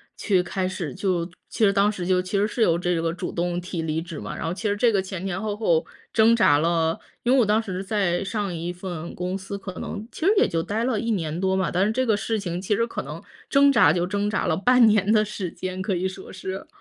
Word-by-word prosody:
去 190 -4 +2
开 185 +1 -2
始， 185 -3 -4
就 185 -3 0 0.2
其 220 - +2
实 200 - +4
当 200 +1 +3
时 185 -4 -5
就 185 -1 +3
其 185 +2 -2
实 205 - +2
是 230 - -4
有 170 -5 +3
这 175 -2 0
个 165 - 0
主 175 - -5
动 175 0 -1
提 175 -1 -4
离 160 0 -1
职 165 -3 -8
嘛。 - - -6
然 - - -5
后 165 - -1
其 210 +2 -2
实 205 - 0
这 230 0 +3
个 195 - +3
前 190 0 -5
前 190 0 -2
后 210 -1 -2
后 165 -7 +2 0.3
挣 225 +1 +5
扎 145 -10 +5
了 165 0 +1 0.2
因 245 - +2
为 270 - +5
我 235 - +4
当 210 +2 +3
时 190 -3 -5
在 195 -4 0
上 200 -2 -2
1 170 +2 -3
份 175 -2 -6
公 180 +2 -3
司 195 +1 -6
可 195 -1 -7
能 215 0 -5
其 325 - -4
实 405 - +5
也 - - +5
就 165 0 -1
待 220 +5 -2
了 245 -5 0
1 230 +1 -1
年 165 -4 -2
多 190 0 +1
嘛， 190 -2 +1
但 185 +2 +1
是 215 - +1
这 255 +3 0
个 220 -3 +3
事 220 0 -1
情 175 -2 -3
其 205 +2 0
实 230 - +1
可 - - -4
能 - - -8 0.3
挣 280 0 +5
扎 155 - +6
就 175 0 0
挣 205 +1 -1
扎 210 - -1
了 160 - +2
半 245 +2 +5
年 210 -1 +3
的 215 -1 +5
时 195 -4 -5
间， 185 0 -5
可 195 0 -1
以 180 +2 0
说 190 0 -9
是。 190 0 -6
190 Hz, 285 characters per minute, -24 LUFS, 175-210 Hz, 0.3 s, 扎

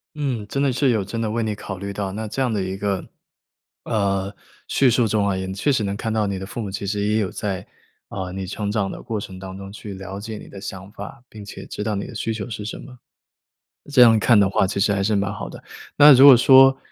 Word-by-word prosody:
嗯， 130 -8 -3
真 140 - -1
的 140 -2 +2
是 130 +2 +2
有 110 -4 0
真 115 +4 -5
的 110 -2 -1
为 115 +2 -1
你 110 -1 -1
考 95 -2 -7
虑 100 +1 -5
到， 100 -1 -4
那 110 +3 -5
这 110 - -5
样 125 -3 +1
的 105 -3 -1
一 95 +1 -4
个， 100 -1 -2 0.8
呃， 100 -2 -1 0.3
叙 135 - +3
述 120 -1 +2
中 105 -1 +1
啊， 100 - 0
也 95 0 -4
确 100 +9 0
实 120 -5 +1
能 100 -1 -2
看 110 +2 -3
到 110 -1 0
你 100 -1 -3
的 95 - -6
父 100 +4 -6
母 105 - -4
其 95 +1 -5
实 100 +1 -2
也 105 +1 +1
有 100 -4 -1
在， 95 -3 -4 0.4
啊， 95 -2 -5
你 95 +1 -5
成 100 +2 -4
长 105 -2 -1
的 - - -8
过 110 -2 -4
程 95 -2 -9
当 95 0 -8
中 100 0 -9
去 105 0 -8
了 95 +1 -7
解 110 +1 -7
你 - - -11
的 100 - -10
想 95 0 -8
法， 110 +3 -10
并 105 -1 -11
且 100 - -9
知 105 - -6
道 105 -1 -1
你 100 - -3
的 130 - -10
需 115 +1 -2
求 110 +1 -6
是 105 -2 -6
什 110 - -5
么。 125 -2 -12 0.9
这 135 -3 +5
样 115 -2 +7
看 110 0 +4
的 100 -1 +3
话 100 - +2
其 95 - -3
实 100 +1 +2
还 100 -1 0
是 110 +2 +1
蛮 100 0 -1
好 105 - -6
的。 - - -11 0.4
那 150 +1 +9
如 130 +1 +8
果 140 -2 +11
说， 135 +2 +7
105 Hz, 285 characters per minute, -22 LUFS, 100-115 Hz, 0.9 s, 果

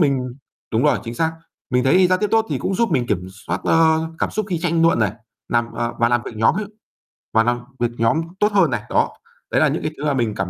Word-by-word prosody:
mình 130 -5 +1 0.4
đúng 115 +2 +2
rồi, - - +3
chính 115 0 -5
xác, 160 +5 0 0.4
mình 125 -1 +2
thấy 180 +8 +5
giao 185 0 +2
tiếp 210 +1 0
tốt 225 0 +3
thì - - 0
cũng 195 - -2
giúp 230 +4 +1
mình 125 -2 +1
kiểm 90 -5 -1 0.2
soát, 85 +2 -2
ơ, 160 -1 +4 0.2
cảm - - -1
xúc 215 -2 -2
khi 175 - 0
tranh 165 -1 +1
luận 165 -5 +4
này, 105 -4 +1 0.4
làm 120 0 0
ờ, 120 0 -2
và 115 - +3
làm 120 0 +1
việc 115 - -8
nhóm 110 +1 +3
ấy, 210 0 -2 0.7
và 115 - +5
làm 120 +1 +1 0.2
việc 120 -1 0
nhóm 115 +8 +2 0.2
tốt 210 +1 +3
hơn 190 -8 +3
này, 115 - -1
đó. - - +1 0.4
Đấy - - +2
là - - +5
những - - -1
cái 155 - -1
thứ 145 - -5
mà 145 - +2
mình 115 -5 0
cảm 95 -2 -2
130 Hz, 265 wpm, -21 LUFS, 115-170 Hz, 0.7 s, thấy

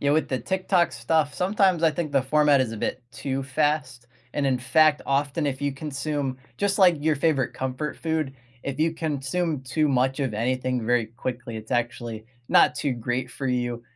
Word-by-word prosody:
Yeah, 140 - +2
with 155 - +1
the 130 - -1
TikTok 185 - +1
stuff, 145 +5 0
sometimes 185 -1 +2
I 165 - +5
think 155 -2 -3
the 135 - +3
format 145 0 +4
is 120 -3 0
a 115 - -5
bit 125 - -3
too 135 +3 -3
fast, 140 -3 -1 0.3
and, 145 -1 +1
in 130 -2 +2
fact, 150 +4 +4
often, 145 +3 0
if 135 0 -2
you 145 - 0
consume 140 -1 -3 0.2
just, 200 0 +1
like, 180 -4 +6
your 155 0 +2
favorite 140 -3 +1
comfort 130 +3 -3
food, 160 -4 -2 0.3
if 140 +1 -4
you 160 +1 +2
consume 155 0 -2
too 150 +4 +1
much 130 +1 +1
of 130 -6 -1
anything 125 +1 -1
very 120 -1 +2
quickly, 120 0 -5
it's 110 +2 -9
actually 120 -2 -2 0.2
not - - +5
too 140 - -1
great 120 +2 -3
for 135 - -5
you, 120 -1 -1
135 Hz, 190 wpm, -25 LUFS, 125-155 Hz, 0.3 s, like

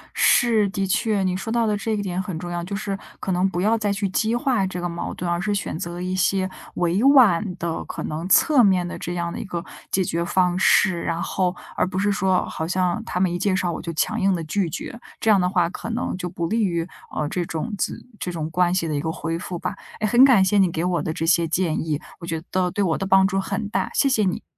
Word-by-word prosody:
是， 220 -4 +4
的 195 0 -2
确， 210 0 +1
你 185 -1 0
说 210 +4 -4
到 235 0 +2
的 210 -1 +1
这 205 +2 -3
一 210 -1 0
点 185 -2 -2
很 190 -4 -5
重 175 +1 -6
要， 175 0 -3
就 195 +3 -5
是， 200 -1 -3 0.2
可 - - -3
能 180 +1 +2
不 175 -1 -2
要 220 +4 +3
再 210 -2 0
去 200 0 -1
激 220 +5 0
化 240 -5 +1
这 180 -1 -5
个 175 - -2
矛 170 0 -4
盾， 175 - -4
而 175 0 0
是 205 +2 0
选 180 -6 -3
择 175 0 -5
一 185 +1 -2
些 185 0 +1 0.3
委 175 +5 +1
婉 255 -10 +6
的、 170 -2 -3
可 - - -6
能 160 +3 -4
侧 275 - +5
面 185 -4 +3
的 - - -6
这 175 - -4
样 170 -1 -2
的 - - -5
一 - - -4
个 175 -3 -4 0.3
解 190 - +2
决 170 -1 -1
方 180 0 +1
式， 185 -2 +4
然 165 0 -2
后 185 -1 -1 0.2
而 - - +2
不 185 0 -5
是 205 +2 +2
说 190 -2 +1
好 160 - -4
像 180 -1 0
他 180 - -3
们 185 -1 +2
一 175 - -2
介 195 -1 +1
绍 180 -2 0
我 - - -5
就 170 - -5
强 155 - 0
硬 195 0 +3
地 170 - -3
拒 175 +3 -1
绝， 215 - -6 0.2
这 220 - +3
样 200 -3 +5
的 180 - +1
话 180 -2 +2
可 220 - -7
能 230 -3 -2
就 180 -1 -4
不 170 0 -3
利 225 +5 +1
于， 170 -3 -1 0.3
呃， 150 - -1
这 180 - -1
种 165 +8 -4 0.5
这 180 - -3
种 160 -2 -4
关 180 +1 +2
系 180 -3 0
的 155 - -2
一 145 - -1
个 160 +1 -2
恢 165 0 -3
复 180 0 -5
吧。 - - -4 0.2
诶， 215 - 0
很 240 +4 +6
感 245 -8 +6
谢 205 +2 +2
你 190 -2 +4
给 165 +1 -2
我 180 -1 0
的 160 - -2
这 160 0 -3
些 170 0 +3
建 165 0 0
议， 155 -3 -1 0.2
我 170 - -8
觉 165 -1 -3
得 165 - -16
都 185 -1 +1
对 205 - 0
我 165 -4 +1
的 195 - -3
帮 190 0 +5
助 195 0 0
很 200 +2 -3
大， - - -1
谢 280 - +3
谢 255 -6 +2
你。 185 - -2
185 Hz, 290 characters per minute, -23 LUFS, 170-200 Hz, 0.5 s, 婉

